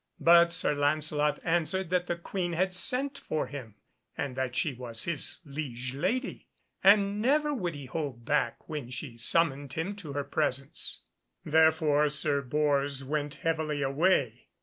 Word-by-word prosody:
But 170 0 +6
Sir 175 -3 +1
Lancelot 150 +1 +1
answered 175 +2 0
that 180 -1 +1
the 175 - -1
Queen 175 0 -4
had 185 +2 0
sent 270 +8 +2
for 155 - -2
him, 125 -7 -9 0.4
and 135 -3 -3
that 130 -1 -3
she 150 - 0
was 120 -2 -5
his 170 0 -2
liege 130 -4 -4
lady, 250 - -2 0.4
and 200 +1 +5
never 295 +5 +2
would 180 - -3
he 140 -2 -8
hold 130 -4 -5
back 150 +3 -1
when 150 -6 -5
she 130 -1 -7
summoned 140 +2 +2
him 180 +6 -3
to 155 -8 -8
her 145 0 -2
presence. 135 - 0 0.4
Therefore 155 -1 +3
Sir 145 -1 +1
Bors 140 0 0
went 145 +1 -3
heavily 155 -3 0
away. 135 -4 +1
150 Hz, 150 wpm, -29 LUFS, 140-175 Hz, 0.4 s, But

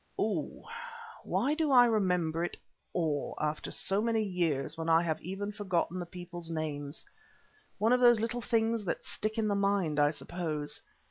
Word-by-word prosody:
Oh! - - -1 0.6
why 290 - +1
do 310 -1 +1
I 245 -2 +8
remember 180 -7 +1
it 175 - -3 0.3
all 155 -5 -1
after 150 0 -2
so 195 +2 0
many 225 -1 +1
years 170 -8 0
when 165 0 -3
I 165 +1 +5
have 160 -2 -1
even 195 +3 -4
forgotten 185 -3 -1
the 175 - -4
people's 175 -1 -7
names? 150 -2 -4 0.7
One 220 +4 +3
of 250 - +4
those 240 -2 +7
little 235 +2 -1
things 225 -1 +1
that 175 - -2
stick 215 +1 -3
in 220 -1 +1
the 205 - +2
mind, 200 -6 +1
I 145 0 +5
suppose. 155 -1 -4
180 Hz, 170 wpm, -31 LUFS, 160-220 Hz, 0.7 s, I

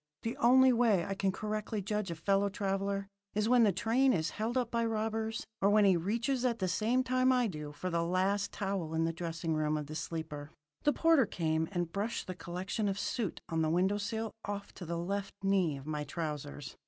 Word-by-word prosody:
The 230 - -2
only 255 +2 +6
way 225 -8 +3
I 195 - -2
can 195 0 0
correctly 215 +2 -3
judge 210 0 -2
a 170 - -3
fellow 195 +4 +2
traveller 195 0 -1 0.3
is 210 +1 +1
when 245 0 +5
the 215 -3 +5
train 235 +7 +3
is 160 -3 0
held 225 +4 -2
up 245 -2 0
by 235 0 +1
robbers, 220 0 -1 0.2
or 200 - +4
when 210 0 +5
he 190 -2 +6
reaches 235 +9 0
at 240 -2 +1
the 185 - -1
same 230 +7 +1
time 255 0 +3
I 250 -1 +3
do 150 -7 -5
for 180 +5 -4
the 170 0 +1
last 190 +4 +1
towel 190 -5 -2
in 165 0 +2
the 165 - -1
dressing 165 0 -3
room 155 0 +1
of 150 - -3
the 150 - -8
sleeper. 155 -2 -5 0.4
The 295 - +5
porter 325 -8 +4
came 160 -4 0
and 175 -3 -2
brushed 210 +5 -2
the 185 - -4
collection 185 +4 -3
of 195 - -2
soot 210 -2 -2
on 165 -1 0
the 155 - +2
window 190 +5 +2
sill 220 +2 -3
off 200 0 -5
to 175 - -9
the 170 +1 -2
left 195 +3 -3
knee 190 -7 +2
of 135 - -10
my 150 -1 -2
trousers. 150 - -5
195 Hz, 215 wpm, -32 LUFS, 170-225 Hz, 0.4 s, only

